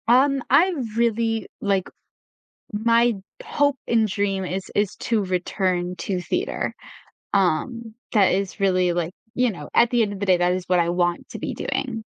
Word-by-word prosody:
Um, 270 +3 +4
I 340 +8 +5 0.2
really, 230 -1 +1
like 195 -2 0 0.8
my 230 +2 +3 0.3
hope 285 -1 +1
and 225 -2 +3
dream 195 -1 -1
is 185 +1 -3
is 205 -2 +1
to 220 -3 0
return 180 -1 -1
to 185 -1 -2
theater. - - -2 0.6
Um, 215 +5 0 0.2
that 200 -5 +4
is 195 +2 -2
really, 185 -2 +3
like 170 0 -2 0.2
you 250 -1 +2
know, 150 -8 -8
at 235 0 +5
the 240 -2 +3
end 205 -2 -1
of 195 - -7
the 200 - -1
day, 185 -1 +5
that 175 0 +2
is 185 0 -2
what 180 -1 +3
I 170 0 +2
want 175 0 0
to - - -7
be - - -4
doing. 225 -5 -3
200 Hz, 170 wpm, -23 LUFS, 180-235 Hz, 0.8 s, I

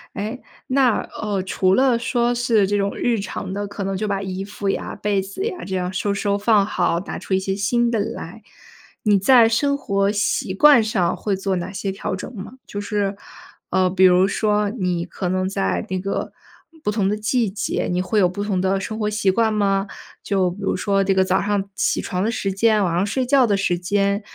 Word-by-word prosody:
诶， 215 +5 -4 0.3
那， 260 -3 +3 0.2
呃， 200 -3 -1
除 190 0 +1
了 255 -1 +3
说 240 0 +1
是 235 -4 +2
这 205 - 0
种 200 0 -1
日 235 -3 +1
常 190 -1 -5
的， 205 0 -3
可 200 0 -6
能 195 0 -2
就 210 +3 -2
把 200 -1 -1
衣 190 0 -4
服 205 0 -6
呀、 - - -3
被 205 -1 0
子 195 - -5
呀， 405 -6 -4
这 190 - -4
样 180 0 -2
收 200 +2 -1
收 200 0 0
放 205 0 +3
好， 175 -4 0
拿出 190 0 -3
一 - - +2
些 190 0 -2
新 235 +4 +1
的 225 - 0
来， 220 -1 -5 0.6
你 205 -2 +4
在 235 +3 +6
生 280 +5 +1
活 200 -6 0
习 205 -2 -1
惯 285 -2 +7
上 195 -5 0
会 205 -2 -2
做 195 0 -1
哪 175 +2 -4
些 195 0 -3
调 190 0 -4
整 210 +6 -8
吗？ 200 +3 -8
就 205 - -5
是， 205 -1 -1 0.5
呃， 185 0 +2
比 190 0 +2
如 185 +1 +6
说， 210 -1 0
你 180 -6 -2
可 180 +1 -4
能 185 +1 0
在 95 - -1
那 185 0 -1
个， 195 +2 -3 0.5
不 210 - 0
同 205 -2 0
的 210 - +1
季 220 +1 0
节， 200 0 -2
你 180 0 0
会 185 +4 0
有 185 - +5
不 200 +3 -4
同 195 -3 -1
的 190 +1 +1
生 215 +3 -5
活 210 0 0
习 205 -2 +1
惯 220 +1 +1
吗？ 195 -1 +1 0.3
就 190 -3 0
比 180 - -10
如 - - 0
说 195 +2 +1
这 195 0 +2
个 190 0 +3
早 185 0 +1
上 200 -1 -1
起 - - 0
床 185 -1 -3
的 220 - +1
时 195 -4 -2
间、 210 +1 +2
晚 170 -2 0
上 180 +3 +1
睡 255 +5 -1
觉 260 -1 +4
的 205 - +2
时 180 -3 0
间， 200 +3 0
200 Hz, 240 characters per minute, -21 LUFS, 190-215 Hz, 0.6 s, 惯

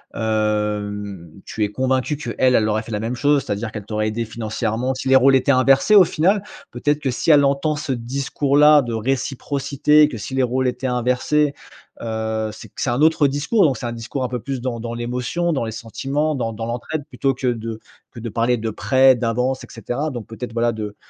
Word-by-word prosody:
hem, 105 -4 -2 0.2
tu 110 - -3
es - - -4
convaincu 130 +5 0
qu'elle, 125 -1 +1
elle 110 -1 +3
aurait 110 +1 0
fait 115 - -10
la 105 - -1
même 115 +3 -3
chose. 145 +1 +2
C'est-à-dire 105 +2 -3
qu'elle 105 -3 -6
t'aurait 110 0 -1
aidé 110 +2 -2
financièrement 110 +3 -2
si 130 - -5
les 135 - +6
rôles 135 +1 +5
étaient 130 +1 +3
inversés, 135 +10 +4
au 190 -4 +9
final. 190 +7 +1 0.3
Peut-être 145 0 0
que 135 - -1
si 125 - -2
elle 145 -1 +6
entend 140 +3 +1
ce 150 -2 -4
discours-là 140 +4 +3
de 120 -2 -4
réciprocité, 140 +4 +1
que 120 - -6
si 105 +6 -7
les 130 - +2
rôles 130 +1 0
étaient 130 +1 -2
inversés, 125 +4 +1 0.5
heu, 110 -1 -2
c'est - - -12
que - - -9
c'est - - 0
un 125 - 0
autre 155 -2 +4
discours. 145 - +1
Donc, 135 -6 +1
c'est - - -6
un 120 - -4
discours 120 +4 -5
un 125 - -2
peu 125 - -3
plus 135 -3 -4
dans 120 -2 -3
dans 115 0 -5
l'émotion, 125 +8 -2
dans 135 - -1
les 110 - -4
sentiments, 135 +7 -2
dans 115 -4 -2
dans 115 +1 -5
l'entraide 125 +6 -4
plutôt 135 -3 -1
que 130 0 -3
de 115 -2 -3 0.3
que 120 - -10
de 115 0 -5
parler 120 +3 +1
de 110 0 -3
prêt, 130 +4 +4
d'avance 125 +2 -1
et - - -10
cetera. 125 +6 -4
Donc, 120 -4 -6
peut-être, 115 +1 -7
voilà, 120 0 +1
de 105 -2 -6
125 Hz, 215 wpm, -21 LUFS, 115-140 Hz, 0.5 s, au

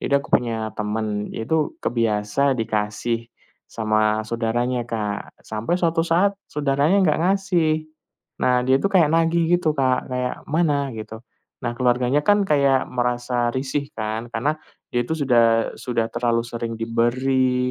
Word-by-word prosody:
jadi 140 0 +1
aku - - -14
punya 115 -3 +1
teman, 105 0 -3
itu 150 +7 -1
kebiasa 115 +4 +1
dikasih 115 +1 -2 0.4
sama 110 -1 +1
saudaranya 120 +2 -1
Kak. 105 -3 -4
Sampai 110 +11 -2
suatu 165 -2 +1
saat 175 +4 +2 0.2
saudaranya 145 +4 +1
nggak 155 -4 +2
ngasih. 175 -6 +1 0.6
Nah 125 -1 +3
dia 130 +1 +4
itu 200 - +1
kayak 170 -5 +5
nagih 165 +1 +3
gitu 160 -3 0
Kak, 130 -2 +1
kayak 125 0 -3
"mana?" 145 -3 +1
gitu. 110 +1 -8 0.4
Nah 120 - -1
keluarganya 125 +3 +2
kan 205 0 +5
kayak 140 -6 +2
merasa 120 0 0
risih 135 +2 -2
kan 110 +1 -3
karena 145 +7 0 0.3
dia 120 0 0
itu 160 - -1
sudah 120 -6 +3
sudah 115 -2 -2
terlalu 120 0 0
sering 115 -1 -5
diberi, 125 +3 +1
125 Hz, 140 wpm, -22 LUFS, 115-145 Hz, 0.6 s, kayak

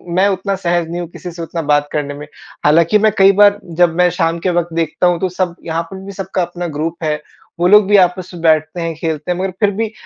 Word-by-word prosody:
मैं 190 +2 +4
उतना 195 +1 -2
सहज 175 -3 -1
नहीं 170 +1 -4
हूँ, 175 - -5
किसी 175 +1 -9
से 170 0 -9
उतना 165 +1 -4
बात 145 0 +2
करने 145 -1 -2
में। 145 +1 -9 0.4
हालाँकि 165 +7 +4
मैं 215 +1 +3
कई 195 0 +7
बार 205 0 +6 0.2
जब 175 -2 +4
मैं 180 0 +4
शाम 165 +1 0
के 185 - -1
वक़्त 170 -1 -5
देखता 165 +1 0
हूँ, 175 -1 +1
तो 185 - -1
सब 180 -1 -2
यहाँ 165 0 -2
पर 190 - -7
भी 200 - -7
सबका 190 -1 -3
अपना 175 0 -4
ग्रुप 165 +2 -4
है, 155 -1 0 0.4
वो 175 - +3
लोग 210 +1 +6
भी 205 0 +5
आपस 180 0 +1
में 175 - -9
बैठते 155 +1 +2
हैं, 165 0 -2
खेलते 160 +1 -3
हैं, 180 - -2
मगर 190 0 -2
फिर 205 -2 +3
भी 215 +2 -3
175 Hz, 255 wpm, -16 LUFS, 165-190 Hz, 0.4 s, कई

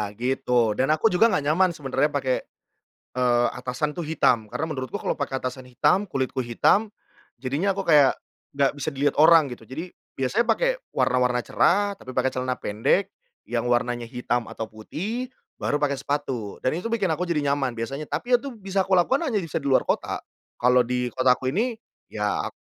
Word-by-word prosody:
gitu, 125 -1 +1
dan 130 +6 0
aku 155 +8 +3
juga 180 +6 +5
nggak 150 -10 0
nyaman 185 +4 +4
sebenarnya 145 0 0
pake, 130 -2 +1 0.8
eee, 120 -1 +3
atasan 125 +4 -2
tuh 170 - -3
hitam, 125 -7 +2
karena 160 +2 -2
menurutku 130 -5 -4
kalau - - -1
pakai 135 -1 -3
atasan 130 0 -5
hitam, 180 +10 +2
kulitku 130 -5 -2
hitam, 205 - +2 0.5
jadinya 150 +10 0
aku 195 - -3
kayak 145 -4 +6 0.4
nggak 140 -1 +2
bisa 145 +1 -3
dilihat 140 +1 0
orang 160 -2 +6
gitu, 120 -2 -9
jadi 160 +10 -6 0.2
biasanya 135 - 0
pakai - - +1 0.2
warna-warna 125 -1 +2
cerah, 200 +7 +2
tapi 130 - -10
pakai 130 - +1
celana 130 0 -2
pendek 120 - 0 0.4
yang 120 0 -1
warnanya 120 0 0
hitam 120 0 -2
atau 110 - -6
putih, 190 - -5 0.3
baru 145 0 -1
pakai 140 -2 +1
sepatu, 135 -7 -3
dan 130 +5 0
itu 180 - -7
bikin 200 -5 +1
aku 160 +3 -1
jadi 150 -5 0
nyaman 135 -3 0
biasanya, 135 +6 -4
tapi 240 - +1
itu 275 0 -7
bisa 195 -3 -2
kulakukan 195 - +2
hanya 220 -9 0
bisa 165 - -4
di - - -5
luar 135 -2 +4
kota, - - -1 0.4
kalau 125 0 +4
di 125 0 -1
kotaku 130 0 +3
ini 230 - 0 0.4
ya - - -1
ak - - -5
140 Hz, 175 wpm, -24 LUFS, 125-180 Hz, 0.8 s, kayak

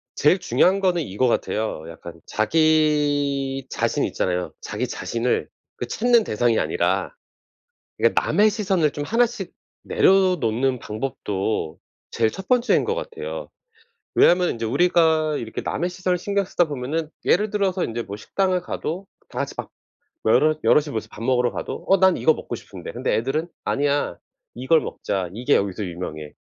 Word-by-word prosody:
제일 150 +6 +4
중요한 190 +2 +3
거는 180 -3 +1
이거 125 -2 0
같아요. 110 -7 -1
약간 85 +1 -10
자기 145 0 +1
자신 - - 0
있잖아요. 90 0 -1
자기 - - -3
자신을 120 +1 -2 0.3
그 - - -5
찾는 240 0 +3
대상이 115 - +1
아니라 - - 0 0.9
그니까 - - +3
남의 210 +1 +3
시선을 195 -8 +1
좀 145 - -4
하나씩 235 +5 0 0.3
내려놓는 135 - +2
방법도 105 -7 -3 0.3
제일 115 -1 +2
첫 190 +10 -9
번째인 250 0 +3
거 460 - 0
같아요. - - -6 0.7
왜냐면 180 0 +5
인제 115 -1 -4
우리가 160 +3 +3
이렇게 110 -1 -5
남의 175 - -2
시선을 180 0 -1
신경 200 +2 0
쓰다 180 -1 +1
보면은 150 +3 -3 0.2
예를 210 +3 +2
들어서 195 -3 0
인제 115 +1 -3
뭐 100 -2 -7
식당을 185 - 0
가도 180 +1 -4 0.2
다 - - -7
같이 - - -3
밥 - - -6 0.5
뭐 - - +3
여럿 155 0 +3
여럿이 150 0 +3
모여서 110 - -4
밥 110 - -9
먹으러 125 0 +2
가도 - - -5
'어 195 - +6
난 190 -1 +5
이거 160 - +3
먹고 - - -7
싶은데.' - - -8
근데 - - -1
애들은 135 +8 -1 0.2
'아니야 145 -8 0 0.4
이걸 130 +7 +3
먹자. 95 -3 -3
이게 125 +7 +1
여기서 100 +1 0
유명해. 80 -4 -6
150 Hz, 340 characters per minute, -23 LUFS, 115-185 Hz, 0.9 s, 어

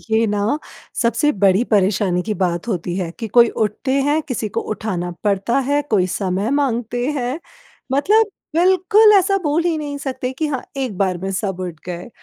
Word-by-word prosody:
ये 225 +1 +3
ना 210 +6 0 0.4
सबसे 270 +6 +2
बड़ी 195 +1 +3
परेशानी 195 -2 +2
की 215 +2 -3
बात 175 +4 -1
होती 175 -3 -2
हैं 175 -3 -2
कि 225 -2 -4
कोई 235 +2 +6
उठते 220 +5 -2 0.2
हैं, 305 +2 +2
किसी 235 -6 -3
को - - -2
उठाना 185 -5 -3
पड़ता 205 +5 +1
है, 290 +1 +2
कोई 210 -10 +1
समय 195 +3 -1
माँगते 245 -3 0
हैं 250 +4 -2 0.5
मतलब 425 +10 +3 0.3
बिल्कुल 375 +5 +5
ऐसा 390 +1 +2
बोल 300 +2 +1
ही 340 -2 +1
नहीं 290 -1 -4
सकते 260 -2 -4
कि 310 +4 -2
हाँ, 275 -4 -3
एक 255 -7 -3
बार 185 -3 0
में 190 +2 -4
सब 190 -1 -3
उठ 175 -4 -6
गए। 175 +2 -6
225 Hz, 180 wpm, -19 LUFS, 190-285 Hz, 0.5 s, कोई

